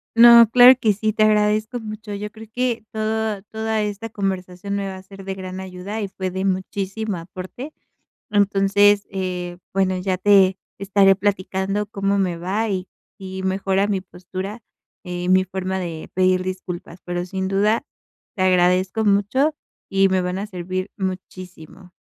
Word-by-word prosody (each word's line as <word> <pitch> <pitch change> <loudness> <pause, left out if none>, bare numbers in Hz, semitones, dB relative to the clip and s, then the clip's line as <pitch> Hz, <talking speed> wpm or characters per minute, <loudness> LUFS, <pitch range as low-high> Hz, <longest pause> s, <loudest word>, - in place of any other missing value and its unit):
No, 235 -1 +9
claro 250 +2 +9
que 215 -4 +3
sí. 215 +2 -1
Te 215 - +2
agradezco 215 +2 +2
mucho. 215 -1 -7
Yo 205 +1 -5
creo 220 0 -12
que 245 -1 -1
todo 220 -1 -1
toda 220 0 -1
esta 210 +2 -4
conversación 195 -1 -3
me 200 -1 -2
va 190 - -5
a 185 - -11
ser 195 0 -12
de 195 0 -4
gran 185 0 -7
ayuda 190 +3 -6
y 205 - -2
fue 190 -1 -5
de 190 +1 -3
muchísimo 195 +2 -2
aporte. 185 - -8 0.6
Entonces, 205 0 +3
eh, 180 -2 -4
bueno, 190 -1 +1
ya 185 0 -1
te 190 -1 +5 0.2
estaré 195 0 +4
platicando 195 +1 -1
cómo 200 -1 -1
me 185 -3 0
va 195 +6 -1
y 185 -2 -3 0.3
y 190 -1 -7
mejora 190 +1 +1
mi 200 -2 -1
postura, 185 +4 -7 0.4
eh, 180 -1 -4
mi 185 0 +4
forma 190 0 -3
de 170 -3 -6
pedir 185 0 +3
disculpas, 185 -2 -6
pero 175 0 -3
sin 190 +1 -3
duda 210 +6 +1 0.5
te 190 - 0
agradezco 185 +3 +2
mucho 210 +9 +2 0.3
y 195 0 +3
me 190 -1 +1
van 180 +1 -2
a 200 - -4
servir 185 0 -4
muchísimo. 185 -2 -7
195 Hz, 160 wpm, -21 LUFS, 185-210 Hz, 0.6 s, No